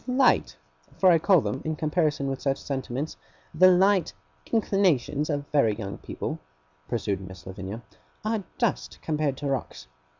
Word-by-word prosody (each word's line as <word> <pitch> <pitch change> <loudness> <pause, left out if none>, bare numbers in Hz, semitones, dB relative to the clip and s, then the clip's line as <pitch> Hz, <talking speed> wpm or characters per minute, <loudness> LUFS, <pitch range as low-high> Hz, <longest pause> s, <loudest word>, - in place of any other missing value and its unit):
'The 250 - -1
light 260 0 +3 0.4
for 185 -1 +6
I 165 - +5
call 180 0 +5
them, 135 - -3
in 155 0 -2
comparison 155 -2 0
with 135 -1 -3
such 135 -1 0
sentiments, 135 +1 -4 0.4
the 185 0 +7
light 190 -1 +4 0.4
inclinations 175 - +2
of 145 -2 -1
very 125 -8 +3
young 100 -3 -6
people,' - - -5 0.5
pursued 100 -4 -2
Miss 95 -4 -10
Lavinia, 95 +4 -7 0.4
'are 215 -2 0
dust, 235 -5 -1
compared 150 -4 0
to 145 - -6
rocks. 135 -2 -3
150 Hz, 155 wpm, -26 LUFS, 125-185 Hz, 0.5 s, the